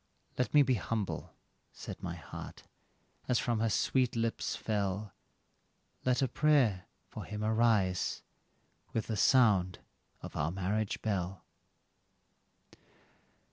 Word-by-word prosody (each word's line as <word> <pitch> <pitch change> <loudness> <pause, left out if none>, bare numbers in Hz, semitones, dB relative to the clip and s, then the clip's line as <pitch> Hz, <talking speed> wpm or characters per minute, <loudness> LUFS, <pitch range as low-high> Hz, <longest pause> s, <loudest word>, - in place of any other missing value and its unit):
"Let 125 - 0
me 145 -1 +7
be 130 -1 +2
humble," 110 -1 -3 0.4
said - - -8
my - - -4
heart, - - -9 0.6
as 125 - +3
from 120 -2 0
her 115 0 +2
sweet 125 +3 +1
lips 115 0 -1
fell, 100 -2 -2 0.9
"Let 125 +1 +2
a - - +3
prayer 135 -11 +3 0.2
for - - -7
him 105 0 -5
arise, 110 -5 +2 0.7
with 115 - -1
the 110 - -2
sound 100 -6 +4 0.5
of - - -8
our 75 +2 0
marriage 100 +4 -2
bell." 95 -4 -2
110 Hz, 115 wpm, -32 LUFS, 95-120 Hz, 0.9 s, me